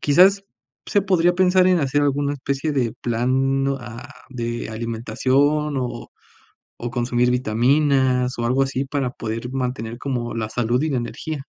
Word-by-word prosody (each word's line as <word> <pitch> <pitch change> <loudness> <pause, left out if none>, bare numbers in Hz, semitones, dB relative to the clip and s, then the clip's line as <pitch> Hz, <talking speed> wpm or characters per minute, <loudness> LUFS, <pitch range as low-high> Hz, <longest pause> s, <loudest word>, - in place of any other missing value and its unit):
Quizás, 190 +7 +5 0.4
se 205 - +2
podría 175 -2 +3
pensar 185 0 +4
en 185 -1 +4
hacer 145 +1 +1
alguna 145 0 +1
especie 140 +2 -2
de 125 -5 0
plan 130 +3 +1
a 120 0 -9 0.2
de 120 -3 -4
alimentación, 130 +6 0
o 125 -1 -4 0.7
o 120 - -3
consumir 120 0 +1
vitaminas, 125 +1 +2
o 120 - -1
algo 130 +3 +2
así 135 0 -2
para 135 -1 -2
poder 115 +1 -5
mantener 125 -3 -3
como 125 -3 -3
la 110 -2 -2
salud 120 +3 0
y 155 - 0
la 140 - -1
energía. 135 +4 -5
130 Hz, 150 wpm, -22 LUFS, 120-145 Hz, 0.7 s, Quizás